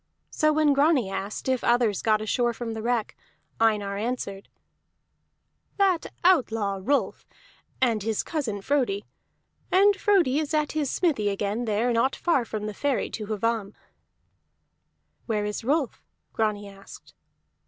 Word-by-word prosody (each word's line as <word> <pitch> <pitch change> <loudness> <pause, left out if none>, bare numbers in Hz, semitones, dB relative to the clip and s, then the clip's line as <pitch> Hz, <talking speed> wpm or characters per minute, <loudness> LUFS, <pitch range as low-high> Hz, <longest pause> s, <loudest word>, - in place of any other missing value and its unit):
So 310 0 +2
when 305 -1 +3
Grani 280 -7 +3
asked 195 +5 -5
if 260 -2 0
others 235 -4 +2
got 215 -1 +2
ashore 240 +2 0
from 230 -1 -5
the 220 - -5
wreck, 235 -1 -1 0.4
Einar 210 -3 +1
answered: 205 -3 -4 1.3
"That 385 -4 +2 0.2
outlaw 225 - +2
Rolf, 280 +8 -1 0.5
and 235 -5 +2
his 220 +1 -1
cousin 230 - -3
Frodi. 245 -8 0 0.7
And 400 +2 +5
Frodi 375 -9 +2
is 310 0 -2
at 300 -1 +1
his 300 -3 -1
smithy 275 - +1
again, 205 +4 -2
there 225 +3 +1
not 235 +4 +2
far 305 -9 +1
from 215 -2 -5
the 215 - -4
ferry 280 +5 -1
to 215 -2 -5
Hvamm." 215 -1 -2 1.5
"Where 210 -3 0
is 210 +2 -4
Rolf?" 280 +1 0 0.3
Grani 210 -2 -1
asked. 195 0 -14
230 Hz, 135 wpm, -26 LUFS, 210-285 Hz, 1.5 s, And